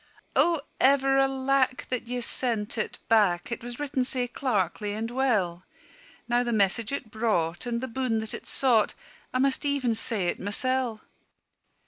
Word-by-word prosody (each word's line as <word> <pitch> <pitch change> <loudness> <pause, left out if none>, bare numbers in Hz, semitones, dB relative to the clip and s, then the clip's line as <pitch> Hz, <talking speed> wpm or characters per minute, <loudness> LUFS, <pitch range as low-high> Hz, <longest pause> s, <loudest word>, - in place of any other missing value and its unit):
"O 335 -3 +3 0.2
ever 270 0 +4
alack 270 -1 +1
that 250 -2 -2
ye 245 0 -3
sent 230 -3 0
it 215 - -2
back, 200 -4 +3
It 235 - -4
was 240 +1 -7
written 280 -3 -1
sae 250 -1 0
clerkly 210 -5 -1
and 225 +2 -3
well! 210 -10 0 0.6
Now 240 0 +3
the 240 -1 -1
message 215 +1 +1
it 270 -6 -4
brought, 205 -4 0
and 235 -1 -1
the 260 - -3
boon 250 -1 -1
that 220 -1 -3
it - - -7
sought, 240 -6 +3 0.4
I - - 0
must 270 +2 +1
even 280 -5 +1
say 215 -3 -1
it 175 - -1
mysel'." 240 +2 -1
240 Hz, 160 wpm, -27 LUFS, 215-265 Hz, 0.6 s, ever